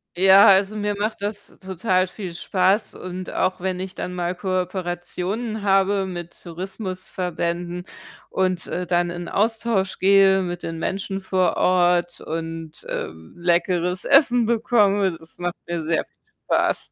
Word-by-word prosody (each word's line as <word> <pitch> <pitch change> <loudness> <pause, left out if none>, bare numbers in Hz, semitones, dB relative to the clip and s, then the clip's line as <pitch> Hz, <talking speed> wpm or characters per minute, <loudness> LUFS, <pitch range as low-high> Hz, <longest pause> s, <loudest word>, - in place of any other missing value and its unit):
Ja, 190 +2 +7
also, 195 +2 +5
mir 205 -1 -1
macht 215 0 -2
das 205 0 -6
total 185 0 0
viel 185 -3 -7
Spaß, 190 +4 +1
und 185 0 -6
auch 185 - 0
wenn 185 -1 -2
ich 185 0 -5
dann 180 - -5
mal 175 0 -1
Kooperationen 185 +4 -3
habe 195 0 +2
mit 175 -2 -8
Tourismusverbänden 180 -1 -4 0.5
und, 185 -2 0
äh, 180 -1 -4
dann 175 0 +1
in 175 0 -6
'n - - -6
Austausch 220 -2 0
gehe 195 0 +5
mit 175 -1 -4
den 165 0 -4
Menschen 195 +2 -3
vor 185 -1 +1
Ort 175 -1 +2
und, 165 -1 -6
ähm, 80 0 -6
leckeres 175 +1 +1
Essen 245 -5 +5
bekomme, 205 -5 +2
das 160 0 -13
macht 175 -1 -3
mir 170 -2 -3
sehr 160 -1 +1
viel - - -43 0.2
Spaß. - - +1
185 Hz, 145 wpm, -23 LUFS, 175-195 Hz, 0.5 s, Ja